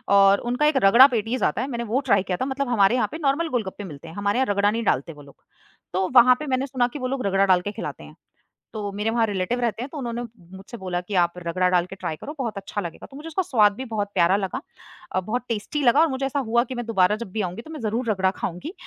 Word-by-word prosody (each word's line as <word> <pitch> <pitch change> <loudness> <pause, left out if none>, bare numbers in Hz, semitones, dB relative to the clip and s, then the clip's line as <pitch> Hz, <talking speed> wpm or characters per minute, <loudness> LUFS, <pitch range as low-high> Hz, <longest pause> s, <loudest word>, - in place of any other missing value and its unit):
और 195 0 +6
उनका 250 +5 +1
एक 300 -2 +2
रगड़ा 235 +7 +8
पैटीज़ 230 -1 -2
आता 150 - 0
है, 260 - -2
मैंने 235 -3 -3
वो 255 - +2
ट्राई 200 -3 +4
किया 180 -1 -2
था - - +1
मतलब 275 +1 -2
हमारे 225 -1 +4
यहाँ 255 - +1
पे 315 - -5
नॉर्मल 285 +4 +1
गोलगप्पे 205 -3 -3
मिलते 160 -4 -10
हैं, 165 - -10
हमारे 200 +3 0
यहाँ 265 - +3
रगड़ा 200 +1 +2
नहीं 230 +2 -2
डालते 165 - 0
वो 145 - -14
लोग। 140 -1 -16 0.6
तो 185 +1 +1
वहाँ 250 +1 +8
पे 305 - -5
मैंने 260 0 0
सुना 250 -2 +1
कि 275 +4 -8
वो 255 - -2
लोग 260 -2 -3
रगड़ा 195 0 +3
डाल 185 -2 +4
के 205 +3 -4
ख़िलाते 225 - -7
हैं, - - -13 0.6
तो 210 -2 -4
मेरे 210 +2 -2
वहाँ 230 0 +2
रिलेटिव 205 +4 -1
रहते 235 -1 -1
हैं, 265 - -7
तो 305 - -9
उन्होंने 240 -3 -4 0.4
मुझसे 195 +5 -10
बोला 180 -3 -3
कि 195 +3 -6
आप 170 0 -2
रगड़ा 180 +1 0
डाल 180 -1 +2
के 195 - -10
ट्राई 175 -4 -4
करो, 290 - -8
बहुत 230 -6 -3
अच्छा 200 +1 -4
लगेगा। 170 -3 -7
तो 275 - -10
मुझे 305 - -9
उसका 325 +3 -1
स्वाद 215 - +3
भी 260 +4 -6
बहुत 210 -3 -3
प्यारा 180 0 +4
लगा 205 +6 -3 0.5
अ, - - +1
बहुत 225 +6 -3
टेस्टी 230 +7 -2
लगा 255 +4 +5
और 330 - +5
मुझे 265 0 -2
ऐसा 275 +1 -1
हुआ 235 -2 +2
कि 260 - -6
मैं 240 -1 -4
दोबारा 210 -3 +2
जब 230 -4 -8
भी 215 - -2
आऊँगी 185 +3 -4
तो 315 - -12
मैं 310 - -7
ज़रूर 230 +2 -2
रगड़ा 190 -2 +1
खाऊँगी। 190 - -5
220 Hz, 275 wpm, -24 LUFS, 190-255 Hz, 0.6 s, रगड़ा